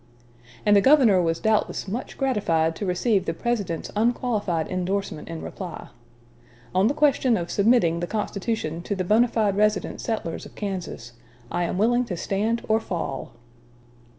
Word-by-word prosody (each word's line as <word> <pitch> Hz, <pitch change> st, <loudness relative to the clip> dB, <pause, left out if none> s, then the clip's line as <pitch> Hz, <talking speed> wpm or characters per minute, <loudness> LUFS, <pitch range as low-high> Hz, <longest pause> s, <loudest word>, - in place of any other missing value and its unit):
And 205 Hz, -1 st, +5 dB
the 200 Hz, -, +6 dB
governor 250 Hz, -8 st, +5 dB
was 165 Hz, -1 st, 0 dB
doubtless 220 Hz, -2 st, 0 dB
much 225 Hz, +6 st, -5 dB
gratified 170 Hz, -, +1 dB
to 205 Hz, -, -3 dB
receive 190 Hz, +2 st, +1 dB
the 165 Hz, -, -2 dB
President's 205 Hz, -9 st, -2 dB
unqualified 215 Hz, -7 st, 0 dB
indorsement 185 Hz, -2 st, -3 dB
in 165 Hz, -1 st, -6 dB
reply: 180 Hz, -4 st, -7 dB, 0.8 s
"On 190 Hz, +3 st, +4 dB
the 275 Hz, -, 0 dB
question 275 Hz, -5 st, +3 dB
of 170 Hz, -1 st, -4 dB
submitting 200 Hz, -6 st, +3 dB
the 175 Hz, -, -3 dB
constitution 205 Hz, -5 st, -3 dB
to 205 Hz, -, -3 dB
the 185 Hz, -, -1 dB
bona 220 Hz, +6 st, +4 dB
fide 215 Hz, -4 st, +1 dB
resident 210 Hz, 0 st, +1 dB
settlers 215 Hz, -8 st, -3 dB
of -, -, -12 dB
Kansas, 180 Hz, -, -5 dB, 0.4 s
I 175 Hz, -, 0 dB
am 175 Hz, -, -2 dB
willing 240 Hz, +4 st, +3 dB
to 180 Hz, -7 st, -4 dB
stand 215 Hz, +6 st, -1 dB
or 220 Hz, 0 st, +3 dB
fall." 170 Hz, -10 st, -4 dB
200 Hz, 155 wpm, -24 LUFS, 175-225 Hz, 0.8 s, the